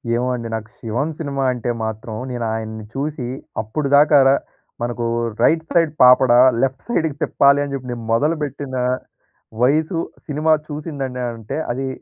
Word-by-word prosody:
ఏమో 125 +1 0
అండి. 115 -1 -5
నాకు 110 0 -6
శివం 120 +6 -2
సినిమా 140 -3 -2
అంటే 120 0 -4 0.2
మాత్రం 110 0 -5 0.2
నేను 120 -2 -3
ఆయన్ని 110 -1 -5
చూసి 140 -2 -3 0.3
అప్పుడుదాకా 145 +5 +3
రా 135 - +6 0.5
మనకు 120 0 -2 0.4
రైట్ 160 0 +4
సైడ్ 165 -3 +3
పాపడ, 125 0 +7 0.3
లెఫ్ట్ 135 -1 -1
సైడ్‌కి 160 -10 0
తిప్పాలని 140 0 +3
చెప్పి, 130 -2 -5
నేను 120 -1 -5
మొదలుపెట్టిన 145 0 -1 0.9
వయసు, 155 +6 +2 0.3
సినిమా 155 +1 +1 0.2
చూసిందండి 140 -4 -5
అంటే 115 +4 -6
అది 135 +2 -3
135 Hz, 135 wpm, -20 LUFS, 120-150 Hz, 0.9 s, పాపడ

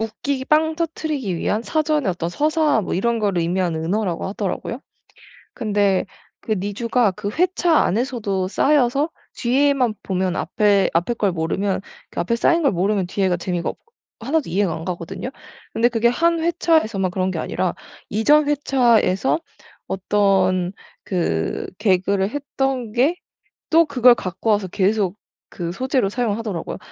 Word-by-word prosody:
웃기기 260 +5 -3
빵 315 +2 +2
터뜨리기 305 - -2
위한 210 +6 -1
사전의 305 -3 0
어떤 170 -2 -2
서사 300 - +1
뭐 - - -3
이런 235 +5 0
거를 200 -4 0
의미하는 170 -2 -1
은어라고 190 -1 -1
하더라고요. 205 +5 -4 0.7
근데 205 -3 +1 0.3
그 220 - -3
니주가 210 +3 0
그 200 +2 -5
회차 345 +2 +1
안에서도 210 -4 0
쌓여서 275 - +2 0.3
뒤에만 260 -1 +2
보면 185 -1 -1
앞에, 205 -2 +2
앞에 175 +8 +1
걸 205 -4 0
모르면 185 +4 -1 0.3
그 - - -4
앞에 235 +7 0
쌓인 335 +7 +2
걸 280 - +4
모르면 190 +1 0
뒤에가 185 -1 0
재미가 175 -1 -2
없 - - -11 0.4
1 280 +8 +1
도 285 - -11
이해가 195 -1 +1
안 160 - -7
가거든요. 175 +7 -5 0.4
근데 235 +1 +3
그게 235 -1 0
1 335 +7 +2
회차에서만 315 - +1
그런 185 0 -1
게 170 - -3
아니라 180 +1 -2 0.4
이전 295 +8 +4
회차에서 255 - +2 0.5
어떤 190 -2 +1 0.3
그 125 - -1
개그를 195 0 +1
했던 270 -4 -2
게 280 +9 +2 0.5
또 330 +1 +6
그걸 250 -4 +5
갖고 195 +2 -4
와서 205 -2 +1
계속 195 0 +1 0.3
그 170 -2 -5
소재로 255 -1 0
사용을 225 -1 -1
하더라고요. 205 -8 -4
215 Hz, 310 characters per minute, -21 LUFS, 185-270 Hz, 0.7 s, 또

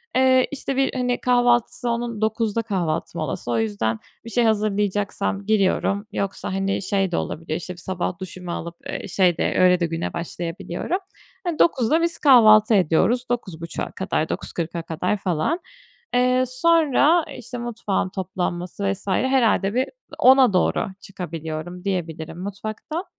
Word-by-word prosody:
Eee, 260 0 +4
işte, 275 -1 -3
bir, 270 0 +1
hani, 250 -1 -1
kahvaltısı 245 -1 +2
onun 235 -2 -2
09.00'da 220 0 0
kahvaltı 180 -8 -2
molası. 135 -5 -3
O 115 - +1
yüzden, 110 +1 -1 0.3
bir 230 - -7
şey 240 +1 +2
hazırlayacaksam, 205 -2 0
giriyorum. 200 -1 +1
Yoksa, 200 -1 -3
hani, 195 +1 -1
şey 195 -1 0
de - - 0
olabiliyor 155 -1 -3
işte, 180 +2 -6
bir - - -17
sabah 180 0 -3
duşumu 180 -1 -7
alıp, 170 0 -5
eee, - - -4
şey 180 -3 +2
de, - - 0
öyle 180 -1 +5
de 170 - +1
güne 165 0 -3
başlayabiliyorum. 170 - -3 0.5
Hani, 340 -3 -3
09.00'da 310 0 +3
biz 335 0 0
kahvaltı 220 -5 +7
ediyoruz. 200 +7 +3
09.30'a 170 -8 -4
kadar, 160 -4 -2
09.40'a 170 0 -4
kadar 165 +5 -1
falan. 190 - -1 0.6
Eee, 250 +1 +3
sonra 315 +3 +3
işte 245 +1 -7
mutfağın 230 -5 -2
toplanması 185 0 -3
vs. 200 +1 -9
herhâlde 230 -3 +2
bir, 255 +2 +2 0.3
10.00'a 260 -4 +6
doğru 185 - +2
çıkabiliyorum 175 -1 -6
diyebilirim, 165 -3 -3
mutfaktan. 215 - -5
200 Hz, 140 wpm, -23 LUFS, 175-245 Hz, 0.6 s, kahvaltı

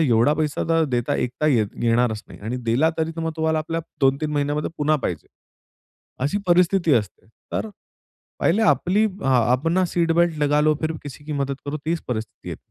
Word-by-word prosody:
एवढा 125 -1 +4
पैसा 150 -1 -1
तर 165 -1 +3
देता 120 +4 0
येता 125 +5 -1
येत 115 -8 +3 0.2
येणारच 115 -2 +1
नाही - - -13
आणि 110 +5 -4
दिला 125 +8 +3
तरी 160 0 0
तर 165 - -3
मग 160 0 -2
तुम्हाला 160 0 +1
आपल्या 165 +1 -2 0.2
2-3 140 +3 +2
महिन्यामध्ये 145 +1 -1
पुन्हा 150 +1 +2
पाहिजे. 85 -4 -3 1.0
अशी 150 +8 0
परिस्थिती 175 -1 +3
असते. 105 -4 -2 0.3
तर 220 - -2 0.7
पहिले 205 +7 +2
आपली 205 0 +3
अ, 190 -7 -4 0.2
अपना 165 +8 +2
सीट 170 -1 +1
बेल्ट 170 -1 +2
लगालो, 150 +1 +3
फिर 160 0 -1
किसी 145 0 -10
की 150 - -5
मदत 140 -1 -1
करो. 145 +1 -3
तीच 165 0 0
परिस्थिती 110 -3 -5
येते. - - -5
150 Hz, 180 wpm, -22 LUFS, 135-165 Hz, 1.0 s, एवढा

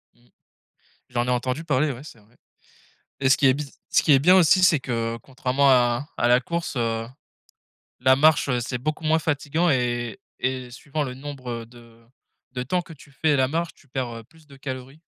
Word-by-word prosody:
Mmh. 120 0 -28 0.8
J'en 120 0 -1
ai - - 0
entendu 125 +4 -1
parler, 150 -1 +1
ouais, 130 +1 -9
c'est 135 -6 -13
vrai 105 +3 -26 0.8
et 135 - +2
ce 135 - +5
qui 140 - +3
est 130 - +5
biz 145 -1 -7
ce - - +4
qui - - +1
est 135 - +7
bien 175 +7 +5
aussi, 185 +1 +5
c'est 155 -5 +4
que, 115 -2 -2
contrairement 135 +1 +1
à 120 +2 +2
à - - +1
la 120 +1 +5
course, 170 +5 -4
heu, 115 -1 -1 0.9
la 130 0 +5
marche, 150 0 +4
heu, 125 - +1
c'est 120 +1 -4
beaucoup 155 +5 -3
moins 160 +1 +3
fatiguant 160 +2 0
et 120 -4 -1 0.2
et 130 -1 -2
suivant 145 +4 -4
le 130 -3 -5
nombre 130 -4 -7
de 115 -1 -18 0.5
de 125 -1 -3
temps 180 +8 0
que 170 - -14
tu 145 -1 -17
fais 150 +2 +1
la 130 -1 +2
marche, 165 +4 -2
tu 145 - -24
perds, 130 -1 -3
heu, 115 - -10
plus 155 +6 -23
de 140 -2 -15
calories. 135 +2 -7
130 Hz, 205 wpm, -24 LUFS, 120-150 Hz, 0.9 s, est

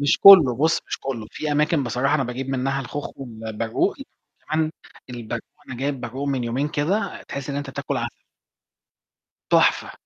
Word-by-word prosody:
مش 145 0 +2
كُلّه، 165 -12 +9
بُصّ، 160 +4 +2
مش - - -4
كُلّه، 120 -5 -4
في 150 -1 -3
أماكن 150 0 +2
بصراحة 125 +5 0
أنا 140 -3 +1
باجيب 125 +2 -5
منّها 135 +1 -1
الخوخ 145 +2 -5
والبرقوق، 115 -3 -2 0.5
كمان 155 0 +1 0.4
البرقوق، 120 -1 -6 0.2
أنا 130 - -6
جايب 135 +1 -2
برقوق 130 +4 -4
من 130 -3 -1
يومين 130 +5 -1
كده، 175 +10 -1
تحِس 140 0 -5
إن 140 - -3
أنت 145 -1 -4
بتاكُل - - -3
عسل. - - -5 1.3
تُحفة، - - +3
135 Hz, 160 wpm, -23 LUFS, 125-145 Hz, 1.3 s, كُلّه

